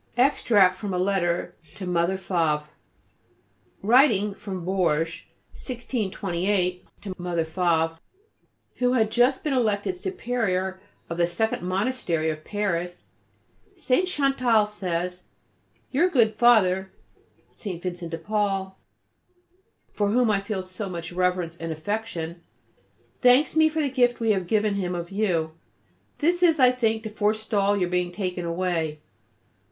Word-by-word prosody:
Extract 225 -7 +4
from 195 0 -4
a - - 0
letter 180 -2 0 0.2
to 195 - -6
Mother 180 +1 +1
Favre. 165 -5 0 1.2
Writing 215 -3 +4
from 190 -3 -7
Bourges, 170 -4 0 0.3
1628, 195 -7 -2 0.2
to 195 -3 -5
Mother 175 -2 -1
Favre, 165 -1 0 0.8
who 250 0 +2
had 220 -4 +2
just 250 +3 +3
been 300 - 0
elected 230 - 0
Superior 225 - -2 0.3
of 170 - -5
the 170 -1 +3
Second 220 +6 -1
Monastery 185 -4 -1
of 155 0 -8
Paris, 180 -4 -3 0.7
St. 350 +1 +1
Chantal 260 - +2
says: 180 -3 -3 0.7
"Your 330 +7 +3
good 230 -9 +3
Father 190 -5 +4 0.6
(St. 185 -6 -6
Vincent 175 -1 -5
de 165 - -4
Paul), 195 +1 -2 1.1
for 205 -1 0
whom 235 +1 +3
I 200 - +2
feel 195 -1 -4
so 185 +2 -6
much 170 -2 -6
reverence 180 -2 0
and 165 -1 -5
affection, 170 -1 -4 0.8
thanks 250 +5 +5
me 315 0 +5
for 315 0 -1
the - - +1
gift 245 -2 +2
we 225 -1 +2
have 190 -4 0
given 215 +1 +2
him 180 -3 -2
of 170 +1 -5
you. 180 -6 0 0.7
This 345 +3 +1
is, 330 -4 +4
I 255 -1 +7
think, 225 -3 0
to 220 - -6
forstall 210 -1 +1
your 180 -2 0
being 180 0 0
taken 180 -2 -3
away. 170 -3 -1
195 Hz, 135 wpm, -25 LUFS, 175-230 Hz, 1.2 s, I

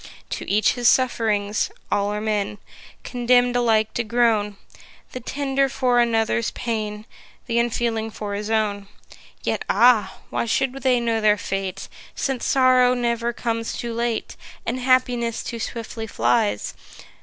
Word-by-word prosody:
To - - -4
each 210 +2 +3
his 245 -1 +1
suff'rings: 215 -5 +1 0.2
all 205 0 +1
are 210 - -2
men, 210 -1 -1 0.5
Condemn'd 245 0 +2
alike 220 -3 +2
to 240 - -1
groan, 220 -3 +1 0.5
The 255 - -6
tender 275 +1 0
for 255 -2 +2
another's 230 -1 +1
pain; 215 -2 -4 0.4
Th' - - -7
unfeeling 230 -1 0
for 210 -2 -6
his 210 +1 -4
own. 210 -2 0 0.6
Yet - - -1
ah! 240 -3 +4
why - - -1
should 255 +3 0
they 255 -2 +3
know 230 -1 0
their 210 -1 +4
fate? 195 -1 -4 0.3
Since 265 -3 -2
sorrow 255 -1 +4
never 235 -1 0
comes 230 -1 -3
too 235 -1 -4
late, 235 -1 -2 0.3
And 245 +3 -2
happiness 250 -2 +1
too 235 - -5
swiftly 225 0 -5
flies. 115 - 0
230 Hz, 140 wpm, -23 LUFS, 215-245 Hz, 0.6 s, ah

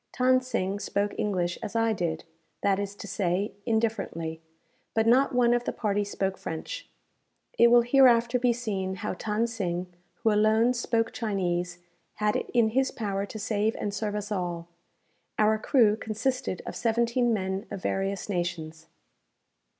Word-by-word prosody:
Than 255 0 +4
Sing 200 -6 -2
spoke 205 0 -1
English 180 -4 -1
as 210 - -6
I 225 -1 +2
did, 165 -5 -2 0.4
that 195 -1 +2
is 200 0 -4
to 205 - -9
say, 195 +1 -1
indifferently; 215 -8 -1 0.5
but 225 0 +3
not 255 +3 +4
one 240 -1 +4
of 240 0 0
the - - 0
party 205 -2 0
spoke 195 -1 -2
French. - - -6 0.7
It 235 - +8
will 240 0 +6
hereafter 245 -1 +5
be 245 0 +3
seen 200 -6 -2
how 210 +3 -3
Than 210 +4 -1
Sing, 180 -6 -3 0.3
who 225 - +4
alone 220 +3 +4
spoke 230 -2 0
Chinese, 180 -5 -2 0.4
had 210 0 0
it - - -2
in 235 -3 +3
his 265 +4 +1
power 200 -2 -3
to 220 - -7
save 215 +1 0
and 205 - -3
serve 210 0 -2
us 210 0 -4
all. 175 -3 -3 0.7
Our 215 0 +3
crew 215 -3 +4
consisted 220 -1 -2
of - - -6
seventeen 235 +1 +1
men 190 -1 -2
of 190 - -7
various 195 0 -1
nations. 170 -4 -4
210 Hz, 160 wpm, -27 LUFS, 190-235 Hz, 0.7 s, It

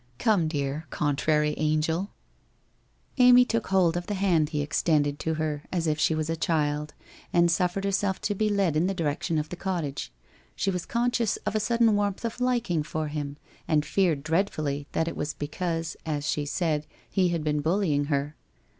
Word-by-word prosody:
' 120 - -35
Come, 205 -8 +2
dear 145 0 -3
contrary 150 +1 +1
angel! 155 +5 0 0.6
' - - -39
Amy 250 0 +8
took 230 -2 -1
hold 180 -3 +3
of 175 0 -3
the 205 - -2
hand 175 -6 +2
he 150 -2 -1
extended 145 -1 +1
to 160 0 -1
her 155 -2 -2
as 175 -3 0
if 155 -1 0
she 155 +1 +3
was 155 -1 -1
a 165 - -1
child, 150 -2 -1 0.4
and 170 0 +4
suffered 180 +2 0
herself 195 -1 0
to 205 - 0
be 215 +2 0
led 195 -6 +1
in 165 +4 +2
the 195 - -1
direc 150 -4 -1
tion 165 - 0
of 150 0 -2
the - - -5
cottage. 170 -6 -3 0.4
She 195 - 0
was 180 -2 -4
conscious 235 -2 +1
of - - -1
a 215 - +1
sudden 230 0 +3
warmth 205 +1 -1
of 230 +2 -4
liking 235 -10 +1
for 155 0 -3
him, 145 -1 -4 0.3
and 150 -1 +2
feared 170 -8 +1
dreadfully 155 -4 -1
that 160 - 0
it - - -3
was 150 0 -3
be 145 - -4
cause, 165 -1 -2
as 150 -1 -2
she 145 -2 -1
said, 155 -2 -1 0.2
he 185 -2 +2
had 170 -2 -1
been 150 -1 0
bullying 160 -3 +1
her. 145 0 -1
160 Hz, 200 wpm, -27 LUFS, 150-195 Hz, 0.6 s, Amy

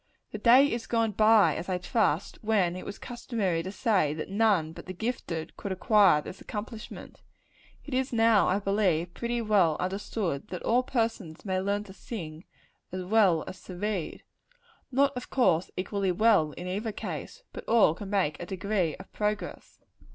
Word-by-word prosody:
The 215 - -5
day 245 +6 +7
is 235 -5 -3
gone 230 -2 +1
by, 215 0 +5
as 180 - -5
I 185 - 0
trust, 180 -2 0
when 200 -5 +2
it 185 - -7
was - - -6
customary 220 -8 -2
to 185 +3 -6
say 195 - +1
that 155 +4 -6
none 200 -7 +2
but - - -11
the 185 - -6
gifted 175 -7 -4
could 200 - -5
acquire 190 -5 +4
this 185 - -9
accomplishment. 215 +1 -8 0.6
It 290 - -7
is 260 +1 0
now, 225 -3 +4
I 185 - +2
believe, 195 -4 0
pretty 235 +2 -2
well 195 -8 +3
understood, 185 -4 -3
that 180 - -6
all 240 +2 +3
persons 225 -10 -3
may 185 -1 0
learn 200 +2 -1
to 195 -2 -12
sing, 165 -6 -8 0.5
as 185 0 -4
well 190 -4 +3
as 185 - -9
to 185 - -8
read. 200 -3 -3 0.7
Not, 275 +1 +2
of 250 - -6
course, 185 -9 +2
equally 195 +1 -1
well, 185 -6 +3
in 175 - -8
either 205 +5 -3
case; 485 - -7
but - - -7
all 225 -8 +5
can 195 +3 -8
make 190 -7 0
a 175 - -6
degree 190 -4 -1
of 190 - -14
progress. 210 0 -4
200 Hz, 175 wpm, -28 LUFS, 180-225 Hz, 0.7 s, day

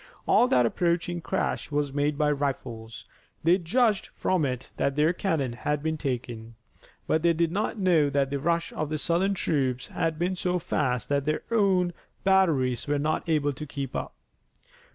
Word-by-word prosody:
All 245 - +5
that 125 - +4
approaching 170 +5 0
crash - - -2
was 145 -2 -1
made 145 0 0
by 150 -1 +2
rifles. 125 -6 -4 0.4
They 175 +4 +4
judged 210 +4 +1
from 180 -5 +1
it 125 -1 -4
that 140 - 0
their 155 +3 +3
cannon 160 - -1
had 150 +4 -2
been 160 0 0
taken, 120 -5 -4 0.5
but 160 - +1
they 170 0 +4
did 165 0 +1
not 210 +4 -1
know 175 -7 +3
that 140 -1 0
the 140 - -1
rush 170 +3 0
of 155 -1 -3
the 155 - -1
Southern 180 +6 +1
troops 130 -7 0
had 165 -2 -2
been 180 +3 0
so 180 0 0
fast 130 -7 -1
that 140 -1 +1
their 155 0 -1
own 190 -5 +2 0.3
batteries 160 -12 +2
were 145 0 +1
not 155 +3 -1
able 145 -2 +2
to 150 +3 -7
keep 140 -2 -5
up. - - -4
155 Hz, 175 wpm, -27 LUFS, 140-175 Hz, 0.5 s, All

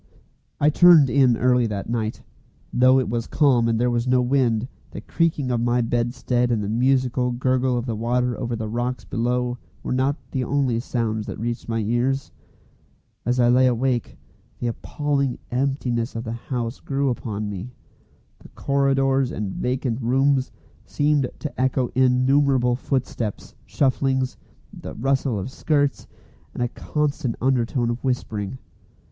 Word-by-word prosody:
I 150 +1 +4
turned 160 -5 +7
in 125 -2 +4
early 125 -1 +3
that 100 -2 -4
night. 115 -1 -3 0.5
Though 130 +1 +5
it 130 - -1
was 115 0 -2
calm 130 -6 +3
and 115 -1 +1
there 125 +1 +2
was 120 +1 -1
no 125 0 +4
wind, 125 -2 +1 0.2
the - - -8
creaking 155 -6 0
of 120 -1 0
my 120 +1 +2
bedstead 120 +1 0
and 115 -3 0
the 100 - -3
musical 125 +1 +1
gurgle 130 0 +1
of 120 - -2
the 115 -3 -2
water 120 +2 0
over 120 0 -3
the 110 -1 -4
rocks 120 +3 -3
below 125 +1 -1 0.2
were - - -2
not 130 +2 +1 0.2
the 130 -2 -1
only 130 -2 0
sounds 110 -3 -2
that - - -5
reached 120 +1 -4
my 115 0 0
ears. 120 +5 0 1.0
As 125 +1 +1
I 120 -1 +4
lay 130 +1 +5
awake, 125 0 0 0.4
the - - -5
appalling 140 +2 -1
emptiness 125 -3 -1
of 115 - -3
the 115 - -5
house 115 0 -4
grew 140 0 -1
upon 110 -3 -4
me. 100 +4 -6 0.7
The - - -15
corridors 135 -1 +1
and 105 -2 -3
vacant 125 -1 -1
rooms 135 +2 +2 0.3
seemed 145 -3 +1
to 150 -4 -5
echo 130 -1 +1
innumerable 130 0 +3
footsteps, 125 -5 -3
shufflings, 130 -1 0 0.4
the - - -8
rustle 135 -1 0
of 100 +6 -5
skirts, 145 -1 0 0.5
and - - -1
a - - +1
constant 140 -4 -2
undertone 120 -1 +1
of 120 - -6
whispering. 115 -4 -2
125 Hz, 150 wpm, -23 LUFS, 120-135 Hz, 1.0 s, turned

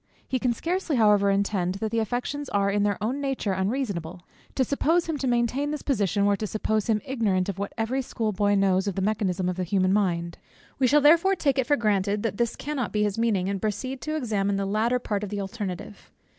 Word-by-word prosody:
He 260 - -1
can 250 -1 +1
scarcely 335 +5 -1
however 210 -3 +4
intend 195 -2 0
that 215 +2 -3
the 230 - +1
affections 245 +6 -3
are 200 -1 +1
in 205 +1 +1
their 205 -1 +1
own 255 +6 -1
nature 270 -8 -1
unreasonable. 190 -4 -3 0.3
To 265 - +3
suppose 320 +6 +1
him 320 -3 -3
to 265 - -1
maintain 245 +4 +1
this 300 -1 -4
position, 205 - +1
were 205 0 +3
to 215 - -3
suppose 215 0 -1
him 215 -3 +1
ignorant 205 -8 0
of 195 -1 -4
what 200 - -3
every 240 +4 0
schoolboy 210 -4 0
knows 195 0 +2
of 200 - -2
the 195 - -1
mechanism 190 -3 0
of 180 0 -2
the 185 - -1
human 185 +1 +1
mind. 170 -4 0 0.4
We 260 - +4
shall 295 +4 +4
therefore 335 +6 +5
take 280 -6 +1
it 250 - 0
for 290 - +3
granted, 205 -2 0
that 215 -3 -2
this 235 -1 0
cannot 280 -5 -3
be 210 0 +1
his 210 +1 -1
meaning, 210 -6 +1
and 195 -1 -2
proceed 255 +5 -3
to 310 0 -3
examine 205 -8 0
the 195 0 -1
latter 220 +5 +1
part 210 -4 -2
of 205 - -4
the 205 0 -3
alternative. 200 -1 -6
215 Hz, 225 wpm, -26 LUFS, 195-255 Hz, 0.4 s, therefore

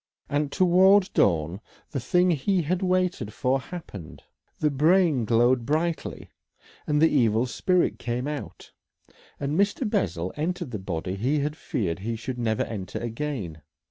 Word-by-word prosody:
And 145 0 0
towards 185 +3 +5
dawn 85 - +1 0.3
the 135 - -2
thing 180 +9 +2
he 175 +4 +1
had 180 +5 -1
waited 180 - 0
for 130 +4 0
happened, 130 - -9 0.3
the 150 -1 +1
brain 155 -3 +3
glowed 120 +2 +3
brightly 160 +5 -2 0.6
and 150 -1 +2
the 160 - +6
evil 115 -5 +2
spirit 175 +9 +1
came 120 +3 -3
out, 150 -1 -7 0.7
and 140 +1 -2
Mr. 205 +6 +1
Bessel 90 - -1
entered 175 -1 -3
the 105 - -4
body 90 -1 -4
he 130 +9 +1
had 150 +1 -2
feared 95 - -3
he 115 +4 -3
should 125 +2 -5
never 110 -2 0
enter 100 -5 -6
again. 115 - -4
135 Hz, 145 wpm, -26 LUFS, 110-175 Hz, 0.7 s, the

